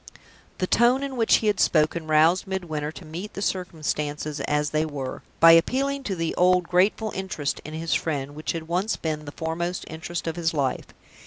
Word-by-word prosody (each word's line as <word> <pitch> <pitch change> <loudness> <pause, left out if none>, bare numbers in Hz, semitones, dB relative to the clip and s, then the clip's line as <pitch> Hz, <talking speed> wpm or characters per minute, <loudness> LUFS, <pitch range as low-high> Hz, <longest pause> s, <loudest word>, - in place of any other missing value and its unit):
The 185 - 0
tone 240 +7 +3
in 275 -1 -4
which 230 -2 +4
he - - 0
had 210 -2 +2
spoken 155 +1 +2
roused 160 +5 +4
Midwinter 160 -6 -3
to 165 - -11
meet 175 +7 -7
the 200 - -4
circumstances 150 -5 -2
as 150 0 0
they 155 0 +1
were, 140 -4 -5 0.2
by 165 0 +9
appealing 270 +12 +3
to 195 - -2
the 165 -2 -2
old 180 0 +4
grateful 205 +4 +2
interest 185 -7 -3
in 155 - -7
his 165 +1 -2
friend 145 -3 -2
which 155 +1 -3
had 165 -1 -5
once 185 +6 0
been 155 -2 -3
the 145 - -7
foremost 170 +3 -3
interest 165 +2 -5
of 165 0 -3
his 165 -1 0
life. 135 -3 -1
165 Hz, 190 wpm, -25 LUFS, 155-185 Hz, 0.2 s, by